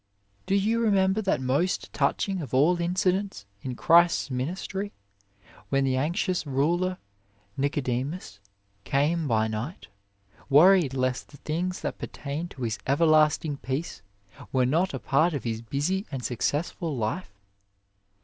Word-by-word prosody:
Do 195 - +2
you 215 +4 +2
remember 200 -2 +2
that 195 -10 0
most 140 +8 0
touching 195 -3 0
of 130 -4 -4
all 170 +6 +4
incidents 185 - 0 0.2
in 130 -2 -5
Christ 170 +1 +4
s - - -10
ministry, 185 +9 -3 0.8
when 135 0 +2
the 130 -1 +1
anxious 170 +6 0
ruler 170 +7 +1 0.6
Nicodemus 135 - -2 0.4
came 150 +3 +1
by 110 -3 +2
night, 110 - -5 0.6
worried 155 -1 +6
lest 130 -1 -1
the 145 - -14
things 175 +6 -3
that - - -4
pertained 150 +4 -5
to 130 - -8
his 115 -2 -2
everlasting 155 0 +3
peace 135 +6 -4 0.5
were 130 -1 +2
not 165 +9 +1
a - - -4
part 155 +4 +2
of 135 - -4
his 115 -1 -3
busy 150 - -2
and 130 -4 -4
successful 145 +4 -2
life 120 +12 -2
150 Hz, 135 wpm, -27 LUFS, 130-180 Hz, 0.8 s, worried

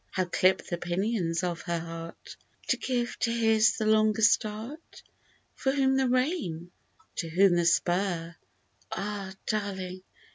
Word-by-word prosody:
How 185 - -1
clip 185 +1 +2
the 175 - -4
pinions 175 -1 -1
of 175 -2 -2
her 170 -3 -2
heart 165 0 -8 0.3
To - - +3
give 245 -2 -2
to 235 - +1
his 225 -1 +3
the 220 - -1
longer 215 0 +3
start? 225 +8 0 0.5
For 265 - 0
whom 265 -1 +2
the 265 -1 +2
rein? 250 - -1 0.2
— 325 - -34
to 165 - -2
whom 185 +2 +4
the 175 -1 +2
spur 175 0 +1 0.6
Ah, 200 -1 -4
darling 190 -3 -3
200 Hz, 145 wpm, -28 LUFS, 175-230 Hz, 0.6 s, whom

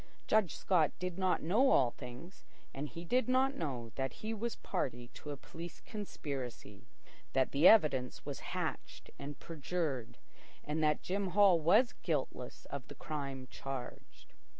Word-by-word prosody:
Judge 215 -6 +3
Scott 170 -6 +3
did 180 0 -4
not 185 -1 +2
know 220 - +4
all 125 - +5
things, 125 +12 -10 0.3
and 145 +2 -4
he 170 +1 -8
did 250 +7 +2
not 260 +2 +4
know 130 - -4
that 135 -2 -1
he 220 - -1
was 230 +2 -2
party 125 -9 -3
to 150 - -10
a 145 - -4
police 165 +5 -9
conspiracy, 135 - -6 0.5
that 130 -1 +2
the 145 +6 +6
evidence 145 - +5
was - - -4 0.2
hatched - - -4
and 140 0 -6
perjured, 155 -6 -3 0.5
that 150 0 +1
Jim 195 +1 -1
Hall 195 -4 +7
was 175 +10 +5
guiltless 140 -6 -2
of 140 -3 -5
the 145 - -10
crime 140 -4 -4
charged. 135 -2 -7
155 Hz, 150 wpm, -34 LUFS, 135-185 Hz, 0.5 s, Hall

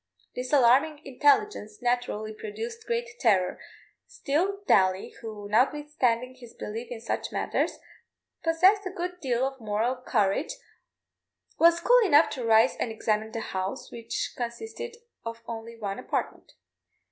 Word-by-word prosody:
This 250 0 -5
alarming 285 +3 +4
intelligence 405 - +2
naturally 240 -3 -1
produced 445 - -7
great 470 0 -1
terror; 190 -7 +2 0.5
still, 375 +8 -1
Daly, 185 -1 +3
who, 215 -3 -7
notwithstanding 255 0 +1
his 245 -2 -14
belief 225 +3 -6
in 240 -2 -6
such 225 - -3
matters, - - -1 0.7
possessed 370 +5 +4
a - - -2
good 360 -1 -5
deal 255 -4 0
of 270 -1 -5
moral 220 +4 0
courage, 250 - 0 1.1
was 335 +1 +6
cool - - +5
enough 315 -5 +5
to 255 - -4
rise 225 +2 +5
and 230 - -2
examine 220 0 -1
the 225 - -4
house, 190 -2 -4
which 230 -1 -4
consisted 445 - -6 0.3
of 230 0 -7
only 230 0 -7
one 200 -3 -4
apartment. - - -4
245 Hz, 135 wpm, -27 LUFS, 220-330 Hz, 1.1 s, was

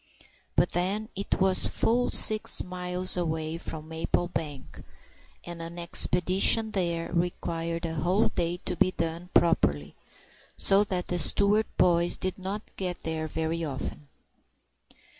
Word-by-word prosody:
But - - +2
then 195 +5 -1
it 200 +1 -3
was 190 -1 +3
full 245 +2 0
six 215 0 +5
miles 180 0 0
away 160 -2 -3
from 155 -2 -8
Maplebank, 160 -3 -4 0.6
and 175 -1 -8
an 165 +1 -8
expedition 180 +5 +3
there 170 -4 -2
required 170 -1 -3
a 165 - -4
whole 180 +6 +1
day 170 +1 -1
to - - -2
be - - +2
done 165 +2 -3
properly, 75 - +1 0.6
so 195 +1 +4
that 185 -3 -3
the 175 - -1
Stewart 205 +6 +3
boys 175 -1 +2
did 185 +1 -3
not 195 +3 -5
get 180 -2 -4
there 160 -1 -3
very 160 +2 -3
often. 145 0 -6
175 Hz, 130 wpm, -27 LUFS, 165-185 Hz, 0.6 s, six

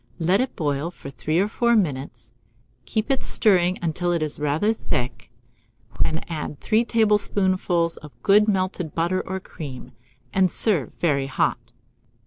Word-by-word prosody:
Let 180 +6 +2
it 260 - -3
boil 145 0 -1
for 140 -5 -10
3 155 +3 -2
or 200 - +1
4 235 +2 +2
minutes; 140 - -2 0.5
keep 220 - 0
stirring 185 -4 +3
it - - -14
until 175 +2 0
it 170 -2 0
is 150 -1 -3
rather 150 +9 +1
thick; 120 - -4 0.7
when 160 0 0
add 150 -3 -5
3 220 +1 +2
tablespoonfuls 190 -6 +1
of 150 -1 -11
good 210 +1 +5
melted 185 -5 -1
butter 175 +3 +1
or 190 0 -4
cream, 145 -8 -9 0.4
and 190 -1 +3
serve 170 - +2
very 140 -5 0
hot. 135 - -1
175 Hz, 145 wpm, -23 LUFS, 150-200 Hz, 0.7 s, good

